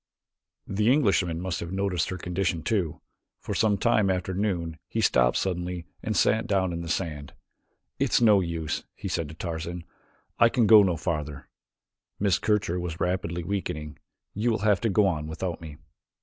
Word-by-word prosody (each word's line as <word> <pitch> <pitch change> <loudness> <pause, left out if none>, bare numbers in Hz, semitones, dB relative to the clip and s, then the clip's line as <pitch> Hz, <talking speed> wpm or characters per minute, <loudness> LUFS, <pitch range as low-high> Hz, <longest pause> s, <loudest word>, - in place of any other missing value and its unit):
The 105 +4 +1
Englishman 95 - +2
must 90 0 -3
have 85 - -5
noticed 95 -3 -1
her 95 - -4
condition 90 -2 -2
too, 95 -9 -1 0.4
for - - -5
some 105 -2 +2
time 105 -1 +2
after 95 0 -1
noon, 90 -5 -2
he - - -3
stopped 60 -1 +3
suddenly 90 -2 -2 0.2
and 110 -2 -2
sat 110 +1 +2
down 95 -3 +1
in 85 - -4
the 85 - -6
sand. 75 -5 -3 0.7
"It's - - +3
no 105 -4 +6
use," 85 -3 -3
he - - -6
said 85 -4 -2
to 80 - -10
Tarzan. 85 0 -5 0.6
"I 115 - +7
can 120 -2 +2
go 110 0 +9
no 90 -4 +1
farther. 75 -4 -4 0.7
Miss 100 -2 +2
Kircher 100 -5 0
is 85 -1 -5
rapidly 90 -1 -1
weakening. 80 -5 -4 0.3
You 110 +4 0
will 115 - +1
have 105 -3 +3
to 115 - +1
go 105 +1 +3
on 75 -5 -1
without 85 +2 -4
me." 75 -3 -9
90 Hz, 175 wpm, -26 LUFS, 85-100 Hz, 0.7 s, go